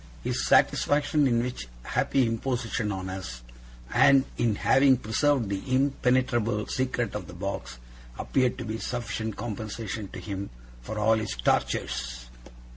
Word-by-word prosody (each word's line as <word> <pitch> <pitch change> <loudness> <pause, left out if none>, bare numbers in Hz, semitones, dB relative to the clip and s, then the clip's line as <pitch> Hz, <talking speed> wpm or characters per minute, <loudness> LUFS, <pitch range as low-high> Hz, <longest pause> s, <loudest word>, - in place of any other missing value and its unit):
His 65 - -1
satisfaction 145 - +3
in 120 -2 +2
which 125 - -5 0.2
happy 135 -2 +1
imposition 115 -2 -1
on 95 -1 -4
us, 95 -11 -6 0.5
and 140 -1 +6
in 115 -3 +1
having 135 +4 +4
preserved 130 +2 +1
the 100 -1 -2
impenetrable 125 -5 +1
secret 125 -3 -1
of 105 -4 -5
the - - -10
box, 85 -10 -5 0.4
appeared 130 -2 +1
to 125 - -5
be 110 0 -3
a - - -9
sufficient 115 -3 -3
compensation 110 -1 -5
to - - -9
him 100 -1 -5 0.3
for 105 - -6
all 105 +1 +4
his 110 -2 -3
tortures. - - -1
110 Hz, 140 wpm, -27 LUFS, 100-130 Hz, 0.5 s, and